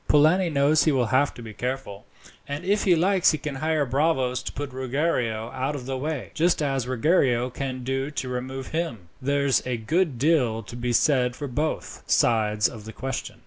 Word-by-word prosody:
Polani 165 +5 +4
knows 150 +1 +3
he 155 - +4
will 130 -3 +2
have 145 +3 +3
to 120 - -9
be 110 -1 -8
careful, 125 -4 -5 0.4
and 145 +5 -5
if 205 +2 +1
he 180 -3 +5
likes 185 +2 +3
he - - 0
can 150 0 -5
hire 155 0 +1
bravos 130 -2 +1
to - - -5
put 145 -2 -6
Ruggiero 125 -4 -1
out 130 +3 -2
of 130 -3 -6
the 135 0 -3
way, 145 0 -4
just 170 +2 +2
as 135 -3 -1
Ruggiero 130 -2 +2
can 130 0 -4
do 135 +2 -2
to 145 -3 -4
remove 130 +1 -5
him. 120 - -3
There's 140 0 +2
a 125 -1 -2
good 155 +5 0
deal 125 -6 +2
to 100 +4 -10
be 120 0 -2
said 125 -1 +2
for 145 - -5
both 150 +5 -3
sides 105 -2 +3
of 110 -4 -9
the 110 - -8
question." 135 +1 -5
135 Hz, 195 wpm, -25 LUFS, 125-150 Hz, 0.4 s, he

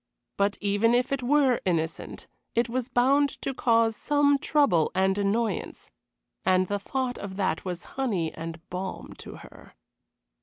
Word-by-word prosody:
But 200 0 +1
even 205 +4 +2
if 250 +2 +1
it 275 -1 0
were 265 -1 +3
innocent, 165 -3 -2 0.3
it 235 0 +2
was 250 +1 -3
bound 275 +3 +2
to 270 - -2
cause 230 -3 +2
some 285 +2 +2
trouble 275 - +2
and 190 +1 +2
annoyance; 205 +1 -2 0.5
and 185 0 +3
the 205 +1 -1
thought 255 +4 -3
of 195 -2 -6
that 190 -5 -1
was 180 -2 -4 0.2
honey 190 -11 -1
and 165 0 -8
balm 185 +1 -5
to - - -9
her. - - -15
220 Hz, 150 wpm, -27 LUFS, 185-255 Hz, 0.5 s, were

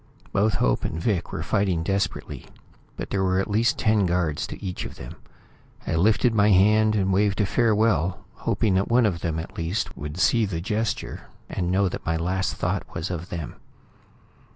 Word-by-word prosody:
Both 105 +2 +2
Hope - - +1
and 80 - -3
Vic 90 -1 -1
were - - -4
fighting 95 -5 0
desperately, 100 +3 -2 0.5
but - - -6
there 95 -1 +1
were 95 0 +2
at 95 - -1
least 110 +3 +2
ten 105 -3 +2
guards 85 -4 0
to - - -8
each 90 -2 -4
of - - -7
them. - - -9 0.7
I - - -2
lifted 110 +7 +3
my 105 -1 +4
hand 105 +3 +4
and 95 -2 +1
waved 100 0 +2
a 105 - +3
farewell, 105 -4 +1
hoping 110 -2 0
that 95 +1 +2
one 120 0 +4
of 90 -5 0
them 80 -2 -2
at 80 - -7
least 85 +7 -2
would 75 +2 -6
see 110 +3 +3
the 85 -4 -3
gesture 105 +2 -3 0.2
and 90 -2 -2
know 95 +2 +2
that - - -5
my 80 0 0
last 90 +3 -1
thought - - -3
was 80 +3 -3
of 85 +1 -5
them. 85 -4 -6
95 Hz, 190 wpm, -25 LUFS, 85-105 Hz, 0.7 s, my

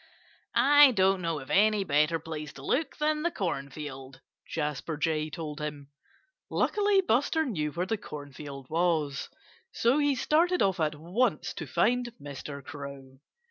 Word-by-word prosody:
"I 290 -1 +7
don't 190 -2 +3
know 165 -3 -1
of 130 - -9
any 210 0 +4
better 150 0 +2
place 155 -2 -6
to 135 - -11
look 305 +5 0
than 300 0 +1
the 345 - +1
cornfield," 140 - -5 0.3
Jasper 150 0 -3
Jay 155 0 0
told 155 -1 -6
him. 145 -2 -6 0.6
Luckily 410 -2 +2
Buster 315 +1 +1
knew 155 - -2
where 175 +1 -1
the 220 +4 -1
cornfield 145 -5 -8
was. 160 -4 0 0.4
So 245 +5 +2
he 290 -2 +2
started 335 +7 +2
off 190 -2 +1
at 155 -1 +1
once 180 +12 0
to - - -6
find 245 -1 +1
Mr. 140 0 -7
Crow. 140 -3 -9
160 Hz, 145 wpm, -29 LUFS, 145-240 Hz, 0.6 s, I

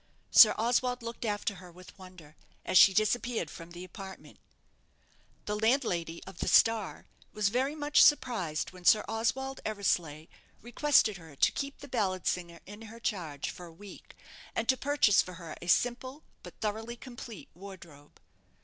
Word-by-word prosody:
Sir 215 - +8
Oswald 245 +2 0
looked 230 +1 -6
after 205 -2 -2
her 180 -1 -13
with 180 +1 -15
wonder, 180 -5 -15 0.3
as - - -3
she 195 - +8
disappeared 215 -3 0
from 165 0 -11
the 175 +1 -10
apartment. 190 +1 -11 1.1
The 210 - -2
landlady 210 -8 0
of 190 -2 -12
the - - -3
"Star" 225 -3 +2 0.3
was 210 -2 +1
very 260 +6 -1
much 295 -1 +3
surprised 220 - +2
when 180 -1 -14
Sir 210 +4 +5
Oswald 265 +4 -2
Eversleigh 175 -7 -2 0.3
requested 240 -3 +2
her 160 -4 -14
to - - +3
keep 280 0 -6
the 285 - -9
ballad 195 -8 -2
singer 170 -2 -3
in 205 +2 -11
her 230 +1 -12
charge 165 -10 -4
for 175 - -11
a - - -13
week, 195 +4 -14 0.4
and 225 - -2
to 260 - +5
purchase 275 -7 +3
for 185 - -9
her 165 -2 -9
a 175 - -9
simple 255 - 0 0.2
but - - -12
thoroughly 220 +2 -4
complete 235 -5 -10
wardrobe. 175 -6 -13
205 Hz, 160 wpm, -30 LUFS, 175-240 Hz, 1.1 s, Sir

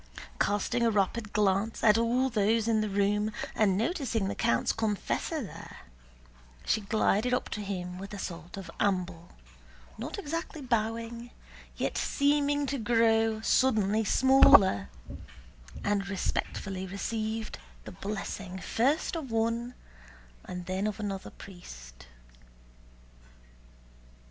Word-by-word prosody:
Casting 205 +4 +1
a 235 - +4
rapid 210 +1 0
glance 205 +1 +1
at 210 -2 +6
all 235 +3 +2
those 220 +1 +2
in 220 -1 +3
the 215 - -1
room 205 +2 +1 0.2
and 195 -4 +2
noticing 230 - 0
the - - -2
count's 115 - +1
confessor 225 - -1
there, 200 - -10 0.9
she 220 - +1
glided 220 +3 +2
up - - -3
to 210 - -4
him 180 -3 -5
with 195 +1 -8
a 205 - -6
sort 170 -1 -7
of 195 - -7
amble, 180 -4 -1 0.7
not 280 - -5
exactly 330 -3 -4
bowing 230 -1 -2 0.5
yet - - -1
seeming 285 0 +2
to 275 0 -2
grow 225 -1 +2
suddenly 220 -4 +3
smaller, 200 - +6 0.9
and 200 -1 0
respectfully 190 0 -3
received 220 +3 -3 0.3
the - - -7
blessing 195 - -5
first 265 - 0
of 310 -6 -4
one 230 +2 -1 0.7
and 180 -1 -6
then 190 +3 -1
of 215 +1 -4
another 195 -2 -4
priest. - - -12
215 Hz, 120 wpm, -29 LUFS, 195-235 Hz, 0.9 s, at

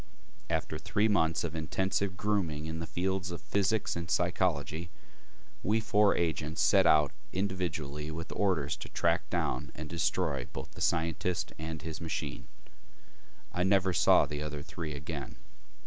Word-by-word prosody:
After - - -1
three 105 +2 +2
months 80 -6 +2
of 85 -2 -3
intensive 95 +4 -1
grooming 90 -8 0
in 80 0 -4
the 80 - -4
fields 95 0 -1
of 85 - -4
physics 100 +1 0
and 85 -1 -4
psychology, 85 +2 0 0.7
we 110 +3 +2
four 105 -1 +4
agents 80 -1 -1
set 95 -3 +5
out 75 -2 +5 0.2
individually 85 -6 -2
with 80 +1 -5
orders 90 -9 +1
to - - -8
track - - +1
down 70 +5 -1
and 75 +1 -6
destroy 85 +2 0
both - - -6
the - - -11
scientist 85 +2 0
and 80 0 -5
his 80 0 -5
machine. 80 -1 -4 1.1
I 90 - 0
never 95 0 +3
saw 85 - +6
the 75 0 -4
other 75 -1 -4
three 80 -1 -5
again.... 70 0 -5
85 Hz, 150 wpm, -31 LUFS, 80-95 Hz, 1.1 s, saw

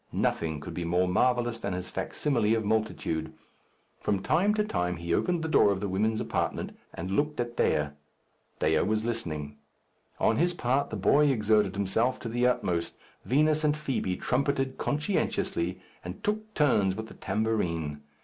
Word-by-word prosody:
Nothing 80 -2 0
could - - -7
be 90 - -3
more 90 +2 +2
marvellous 120 +4 +2
than 100 - -3
his 90 0 -5
facsimile 115 -7 0
of 110 -2 -1
multitude. 100 -7 -1 0.7
From 95 -2 -1
time 190 - +3
to 210 - +2
time 90 - -1
he 85 0 -2
opened 175 - +1
the - - -1
door 155 - +5
of 95 - -1
the 100 - -2
women's 110 +4 0
apartment - - -2 0.2
and 90 +3 -5
looked 150 +7 0
at 120 0 -2
Dea. 75 -1 +2 0.7
Dea - - +2
was 110 +1 0
listening. 75 -11 -3 0.6
On - - +3
his 175 +3 +2
part 130 +4 +1
the - - -4
boy 150 +1 +4
exerted 105 -6 +2
himself 110 +6 +1
to 115 - -4
the 120 +2 +2
utmost. 85 -9 0 0.3
Vinos 155 +4 +3
and 150 0 +2
Fibi 135 -11 -1
trumpeted 135 0 0
conscientiously, 120 - -1 0.2
and 90 +1 -8
took 215 +1 -2
turns 105 -11 +3
with 110 +1 -5
the - - -12
tambourine. 85 -10 -1
110 Hz, 165 wpm, -28 LUFS, 90-140 Hz, 0.7 s, door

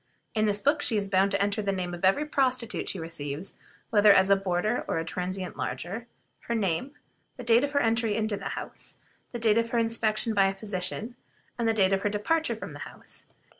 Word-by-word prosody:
In 215 -1 +2
this 205 -1 +2
book 290 +5 +2
she 230 -6 +2
is 200 -1 0
bound 195 0 +3
to 195 0 0
enter 200 +2 0
the 200 -1 0
name 180 -2 -3
of 175 - -8
every 195 +11 +3
prostitute 255 -5 0
she - - -1
receives, 160 0 -4 0.4
whether 210 -1 +7
as 190 0 +5
a - - +8
boarder 195 +4 0
or - - -1
a 165 - -2
transient 180 +2 -3
lodger; 225 +7 -4 0.4
her 235 - 0
age, 200 +3 0 0.5
the 250 - -7
date 235 +2 +4
of 285 0 -2
her 285 - +3
entry 225 -3 +1
into 215 -1 -1
her - - -5
house, - - -5 0.3
the 240 - -4
date 225 -1 +3
of 230 0 -1
her 240 - -1
inspection 225 -1 +1
by 195 -2 +4
a 195 - -2
physician, 200 +3 -2 0.4
and 230 - +1
the 225 - +3
date 195 -2 +3
of 195 - +1
her 205 - +1
departure 315 +11 0
from - - -8
the - - -9
house. - - -9
210 Hz, 220 wpm, -27 LUFS, 190-230 Hz, 0.5 s, a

